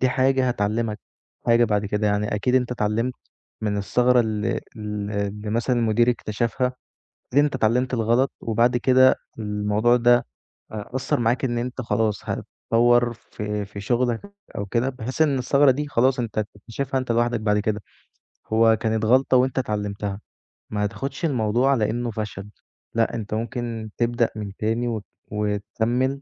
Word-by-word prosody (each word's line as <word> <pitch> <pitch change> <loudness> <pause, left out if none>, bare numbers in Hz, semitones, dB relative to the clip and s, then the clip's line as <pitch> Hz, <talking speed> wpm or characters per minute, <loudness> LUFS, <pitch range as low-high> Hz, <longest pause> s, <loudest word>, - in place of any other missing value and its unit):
دي 130 - +3
حاجة 130 0 +2
هتعلّمك 110 0 -1 0.5
حاجة 120 0 +5
بَعد 105 -2 0
كده. 105 +1 0
يعني 105 +1 0
أكيد 125 +5 0
أنت 125 -1 +2
اتعلّمت 115 +2 -1 0.5
من 105 -1 0
الثغرة 125 +5 +3
ال 110 -2 -1
ال 105 -2 -4
اللي 105 +1 -3
مثلًا 120 +3 +1
المدير 115 +1 +3
اكتشفها، 120 +2 -1 0.7
أكيد 145 +1 +6
أنت 145 -2 0
اتعلّمت 125 +2 +1
الغلط 120 +3 +2
وبَعد 120 +2 +2
كده 130 +1 +5 0.2
الموضوع 105 +3 +1
ده 120 0 +5 0.5
أ 110 +4 -7
أثّر 130 - 0
معاك 120 +3 +1
إن 120 -1 -1
أنت 125 +2 -3
خلاص 110 -3 0
هتطوّر 120 +1 +2
في 105 -2 -5
في 100 0 -9
شُغلك 120 +1 0 0.4
أو 100 - -2
كده 120 +6 0
بحيث 130 +4 -4
إن 145 -4 +3
الثغرة 140 +2 +4
دي 145 +3 -2
خلاص 130 0 +2
أنت 115 -3 -4
هتكتشفها 115 +6 -4
أنت 130 -2 -2
لوحدك 120 0 +1
بَعد 105 -1 +1
كده. 105 0 -1 0.7
هو 110 0 +4
كانت 110 -1 0
غلطة 130 +2 +4
وأنت 130 +1 +2
اتعلّمتها 105 -3 -3 0.5
ما 105 -1 -1
تاخُدش 135 - -4
الموضوع 125 -1 +2
على 110 -6 +2
إنّه 120 0 -2
فشل 105 -2 -5 0.5
لأ، 115 0 +2
أنت 110 -2 -5
ممكن 115 -1 -4
تبدأ 120 0 +1
من 105 -2 -5
تاني 115 +3 0
وت 110 -4 -4 0.3
وتكمّل 110 +6 -1
115 Hz, 155 wpm, -23 LUFS, 105-125 Hz, 0.7 s, أكيد